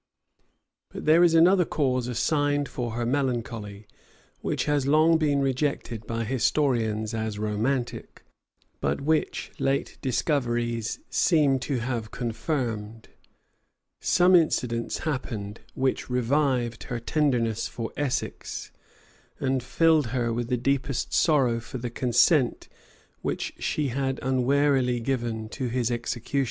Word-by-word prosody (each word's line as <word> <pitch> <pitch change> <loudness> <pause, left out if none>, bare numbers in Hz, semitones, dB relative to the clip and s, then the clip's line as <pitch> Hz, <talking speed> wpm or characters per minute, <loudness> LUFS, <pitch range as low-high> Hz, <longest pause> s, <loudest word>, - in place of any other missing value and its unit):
But - - -8
there 160 +3 +6
is 170 -1 +5
another 180 +3 +6
cause 130 -6 0
assigned 145 +3 +1
for 120 -3 -4
her 120 +1 -2
melancholy, 115 -6 -2 0.5
which - - -2
has 145 -2 +1
long 160 +3 +5
been 145 -3 +2
rejected 135 -5 -2
by 115 0 -2
historians 115 -3 0
as 110 -1 -3
romantic, 115 +5 -2 0.6
but - - 0
which 155 +2 0
late 135 +1 -1
discoveries 120 -4 -1
seem 150 -6 +3
to 130 -2 -2
have 120 -3 -3
confirmed:[*] 115 -3 -3 0.9
some 180 +1 +4
incidents 125 -8 +1
happened 115 -8 -3 0.2
which 130 0 -1
revived 125 -1 0
her 120 -2 -4
tenderness 120 -5 0
for 115 -1 -5
Essex, 145 -4 -3 0.7
and 130 -1 0
filled 155 +2 +3
her 120 -1 -1
with 120 0 -2
the 125 - 0
deepest 135 +1 -1
sorrow 130 -7 +3
for 115 +3 -7
the 120 -1 -5
consent 125 +3 +2 0.5
which - - -3
she 150 -3 -1
had 135 +1 -1
unwarily 130 -1 +2
given 115 -3 -2
to 130 +2 -3
his 120 0 0
execution. 120 +3 -2
125 Hz, 120 wpm, -26 LUFS, 115-145 Hz, 0.9 s, there